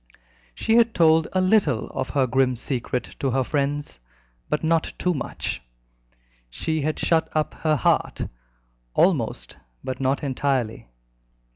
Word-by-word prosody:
She 225 +1 +2
had 230 -1 +4
told 160 -1 +5
a 185 - +1
little 185 - +3
of 130 -1 -4
her 135 -3 +2
grim 130 +1 +2
secret 125 0 -2 0.2
to 135 - 0
her 130 +1 +1
friends, 145 - -2 0.5
but 150 - -1
not 160 0 +1
too 180 - +1
much; 140 - -4 0.9
she 155 - -2
had 155 +2 -1
shut 160 -1 +2
up 155 -1 0
her 155 -1 +1
heart 140 - +1 0.7
almost, - - +1 0.3
but 130 - -4
not 135 +2 0
entirely. 130 - -1
145 Hz, 135 wpm, -24 LUFS, 130-160 Hz, 0.9 s, told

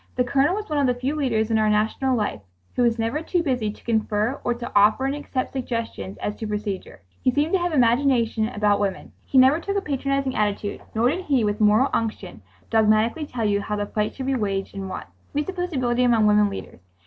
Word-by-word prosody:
The 250 - +2
Colonel 275 +7 +2
was 425 0 -4
one 300 -2 -1
of 275 - +3
the 245 -1 0
few 265 +4 -1
leaders 230 -7 0
in 220 - +3
our 215 0 +3
national 220 +5 +1
life 210 - -2 0.3
who - - +1
was 235 -1 +3
never 230 +7 -1
too 345 +1 0
busy 250 -8 0
to - - -16
confer 220 +2 0
or 240 - 0
to 240 0 -7
offer 210 +6 +4
and 270 - 0
accept 285 -3 -4
suggestions 230 - -4
as 210 - -3
to 220 - -5
procedure. 205 - -4 0.2
He - - +2
seemed 290 +6 0
to 380 - +4
have 350 0 -1
imagination 240 -4 +2
about 210 -3 +1
women. 195 -2 -3
He 270 - 0
never 260 +5 +6
took 400 +4 -2
a - - +1
patronizing 275 -3 -1
attitude 205 -1 -1
nor 230 +3 +3
did 365 +4 -4
he 270 -5 +2
with 210 0 -1
moral 215 +6 +4
unction 215 - -3 0.3
dogmatically 220 +6 +2
tell 235 -4 -3
you 205 -1 +1
how 210 +1 -3
the 205 0 -2
fight 210 +1 -2
should 265 - -5
be 270 - 0
waged 200 -5 -2
and 195 -1 -5
won. - - -5 0.3
He 295 - +1
presupposed 360 -1 -4
ability 250 -1 +1
among 235 -3 +4
women 210 0 +4
leaders. 195 - -8
235 Hz, 225 wpm, -23 LUFS, 210-270 Hz, 0.3 s, never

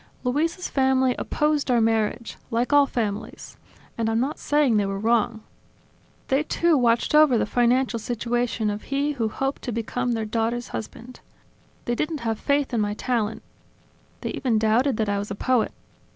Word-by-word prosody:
Luisa's 320 +8 -1
family 265 -1 +2
opposed 300 -2 0
our 245 -1 +4
marriage; 225 +1 0
like 240 +3 0
all 285 -1 +6
families 215 -4 -4 0.4
and 225 -1 +1
I'm 225 0 +1
not 270 +5 -2
saying 290 -6 +2
they 205 - +2
were 195 0 -3
wrong 225 +1 +1 0.9
they 270 +2 +2
too 335 +2 +2
watched 240 -1 +2
over 300 -5 +6
the - - +1
financial 245 0 +1
situation 235 -1 -1
of 205 +1 -6
he 280 +2 0
who 230 -6 -1
hoped 270 +5 -3
to 245 - -4
become 240 +2 -2
their 225 -1 -2
daughter's 230 +2 -2
husband. 235 +3 -8 0.7
They 240 - 0
didn't 305 +4 -2
have 225 -2 -2
faith 280 -2 0
in 230 - +1
my 205 0 -1
talent; 225 -2 -2 0.8
they - - -3
even 245 -5 0
doubted 225 +4 +2
that 220 - 0
I 200 0 0
was 205 - -5
a 200 - -4
poet. 250 +2 +1
240 Hz, 170 wpm, -24 LUFS, 225-270 Hz, 0.9 s, all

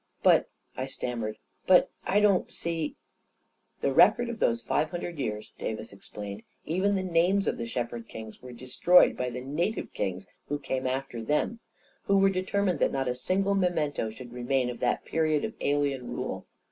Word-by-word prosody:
"But," - - +5 0.3
I 130 - -3
stammered; 120 -5 -4 0.3
"but 185 -1 +6 0.2
I 205 +2 +3
don't 200 -3 +3
see.. 165 -2 -3 0.3
." - - -46
" - - -43
The 140 - +1
records 235 - +5
of 230 - -7
those 115 0 +1
five 155 +6 +1
hundred 175 -1 -5
years," 105 -4 -4
Davis 110 -2 -4
explained, 100 +1 -8 0.2
" - - -42
even 200 +2 +2
the 190 - 0
names 185 +3 +2
of - - 0
the 115 - -3
shepherd 120 -1 -4
kings, 110 -1 -9
were 125 - -9
destroyed 130 +9 +4
by 125 0 -2
the 125 +1 -5
native 170 - -2
kings 95 -1 -3 0.2
who 145 - -1
came 130 -2 -2
after 130 -2 -3
them, 150 - 0 0.5
who 200 - +4
were 195 0 +5
determined 185 -2 0
that - - +3
not 135 -1 -1
a 125 - +1
single 190 +10 0
me 195 -2 +3
mento 150 -9 -1
should 120 +2 -11
remain 125 +1 0
of 120 - -9
that - - 0
period 155 -2 +1
of - - -5
alien 140 -3 0
rule. - - -4
140 Hz, 190 wpm, -28 LUFS, 120-180 Hz, 0.5 s, but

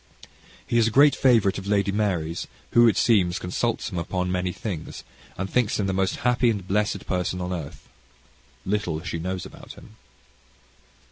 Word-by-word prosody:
He 120 - +1
is 115 - +4
a - - +2
great 140 +5 +5
favourite 110 -7 +3
of 100 - -9
Lady 100 -1 +1
Mary's, 90 -6 -1 0.2
who 120 0 +6
it 110 - +3
seems, 95 -7 +3
consults 115 +6 -2
him 90 - -3
upon 90 +2 -2
many 90 0 -1
things, 90 -4 -6 0.3
and 95 - -2
thinks 115 0 0
him 100 - +1
the 95 - -1
most 95 0 0
happy 125 0 +3
and 100 -5 -2
blessed 105 +2 0
person 90 0 -2
on 90 0 -3
earth. 80 -6 -7 0.8
Little 95 -4 -1
knows 85 +3 -8
she 85 - -3 0.3
about - - -12
him. 110 - -16
95 Hz, 175 wpm, -24 LUFS, 90-110 Hz, 0.8 s, who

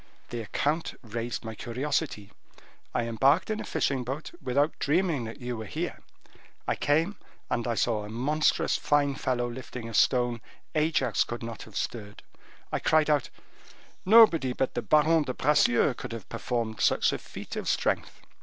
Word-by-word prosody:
The 120 - -3
account 150 +8 -1
raised 115 +1 -4
my 110 - -5
curiosity, 120 -2 -3 0.6
I - - 0
embarked 135 - +2
in 215 - -2
a - - -4
fishing 135 -2 0
boat, 135 +6 -5
without 145 +5 0
dreaming 155 -4 +1
that 115 - -8
you 125 -1 -4
were 110 -1 -6
here: - - -4 0.7
I - - +1
came, 165 +7 +1 0.3
and 120 0 0
I 120 - 0
saw 110 -2 +1
a 105 - -8
monstrous 145 +7 +1
fine 145 -1 +2
fellow 125 -2 -1
lifting 120 -1 -7
a 115 - -8
stone 120 +1 +3 0.3
Ajax 155 -6 +2
could 120 0 -6
not 115 -1 -6
have 105 - -8
stirred. 105 -3 -5 0.5
I - - 0
cried 155 -1 +3
out, 145 -3 +1 0.7
'Nobody 185 - +6
but 130 - -1
the - - -1
Baron 155 +2 +4
de 130 -4 -3
Bracieux 145 -3 +3
could 115 - -7
have 115 -4 -7
performed 115 -3 -3
such - - +3
a - - -3
feat - - -9
of - - -4
strength. - - -1
125 Hz, 165 wpm, -28 LUFS, 115-150 Hz, 0.7 s, Nobody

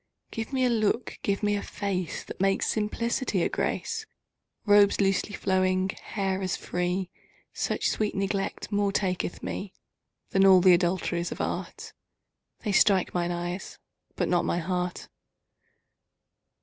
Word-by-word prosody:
Give 225 +3 -4
me 260 -2 +2
a - - +3
look, 225 +1 0
give 200 +1 -1
me 205 0 +2
a 200 - -2
face 190 -5 -3
That - - -8
makes 195 0 +2
simplicity 230 +4 0
a - - +1
grace; 455 -1 -2 0.6
Robes 205 -1 +6
losely 195 +1 +1
flowing, 185 0 +1
hair 195 -1 -3
as 185 -1 -1
free; 180 +1 -2 0.4
Such - - -1
sweet 215 -1 -1
neglect 195 +2 -2
more 205 -1 +1
taketh 185 -3 -2
me 195 -1 -5 0.6
Than 195 - +4
all 190 -1 +8
th' 180 - -1
adulteries 175 -1 0
of - - -6
art. - - -4 0.7
They 210 - -2
strike 195 -2 +4
mine 175 -1 0
eyes 175 +2 -4 0.4
but - - 0
not 175 -1 +2
my - - 0
heart. 180 +1 -2
195 Hz, 140 wpm, -27 LUFS, 180-205 Hz, 0.7 s, all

